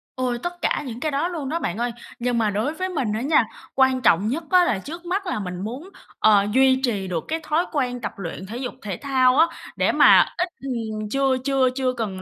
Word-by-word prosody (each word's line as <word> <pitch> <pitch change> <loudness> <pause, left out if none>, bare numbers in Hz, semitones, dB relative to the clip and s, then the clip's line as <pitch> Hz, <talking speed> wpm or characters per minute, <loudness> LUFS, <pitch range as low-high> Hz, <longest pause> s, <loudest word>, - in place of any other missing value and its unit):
Ôi, 250 -2 -1
tất 350 0 -5
cả - - 0
những 235 0 -6
cái 310 +1 -1
đó 285 +5 0
luôn 310 -6 -4
đó 335 +2 -1
bạn 175 - -3
ơi. 240 0 -1 0.3
Nhưng 240 0 0
mà 220 -2 +2
đối 220 +10 -1
với 370 +3 -3
mình 260 -12 -1
á 220 - -2
nha, 280 -4 +3 0.3
quan 260 -1 +3
trọng 200 -1 +3
nhất 310 +8 -2
á 365 -1 +6
là 205 - 0
trước 335 - -9
mắt 390 +3 -2
là 330 - -2
mình 180 -2 -5
muốn, 255 - -6 0.3
ờ, 205 -2 +5
duy 260 +1 +4
trì 205 -6 -1
được 170 -3 -3
cái 320 +1 -2
thói 325 +4 +1
quen 250 -4 -1
tập - - -3
luyện 175 -1 -6
thể 225 +5 -7
dục 250 -1 -4
thể 195 -5 -5
thao 260 -2 +2
á. 330 - +6 0.3
Để - - +2
mà - - +7
ít, 360 0 0
ừm 220 -5 -4
chưa 270 -1 +2
chưa 270 -2 +3
chưa 255 -1 0
cần 205 -6 -4
255 Hz, 240 wpm, -23 LUFS, 215-300 Hz, 0.3 s, mà